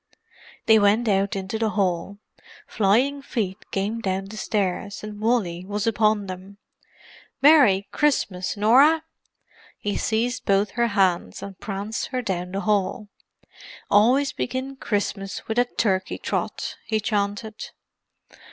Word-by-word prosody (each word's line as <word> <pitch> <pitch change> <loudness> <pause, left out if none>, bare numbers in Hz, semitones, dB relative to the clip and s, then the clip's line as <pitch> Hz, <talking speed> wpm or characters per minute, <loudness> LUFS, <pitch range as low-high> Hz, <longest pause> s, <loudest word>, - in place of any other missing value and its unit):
They 220 -1 +6
went 210 +3 +3
out 195 -1 +1
into 195 +3 -4
the 225 -1 +1
hall. 195 -1 -1 0.5
Flying 245 +8 +1
feet 210 -7 -3
came 205 +4 -2
down 190 -1 -2
the 205 +2 -10
stairs, 200 -2 -2
and 210 -1 -7
Wally 210 -7 0
was 205 +2 -3
upon 215 -2 +2
them. 185 +1 -9 0.8
"Merry 265 -10 +5
Christmas, 205 -11 0
Norah!" 275 +10 +5 0.7
He 205 - -3
seized 235 +3 -1
both 200 +1 +2
her 235 +2 +1
hands 190 - 0
and 195 -2 -9
pranced 205 +1 -4
her 255 -1 -3
down 180 -4 -3
the 195 - -2
hall. 210 +1 0 0.8
"Always 255 +7 +4
begin 260 +2 -4
Christmas 200 -5 -3
with 225 +2 0
a 245 - +4
turkey 190 -6 -1
trot!" - - -3
he 220 -1 +1
chanted. 210 0 -2
210 Hz, 130 wpm, -24 LUFS, 195-230 Hz, 0.8 s, They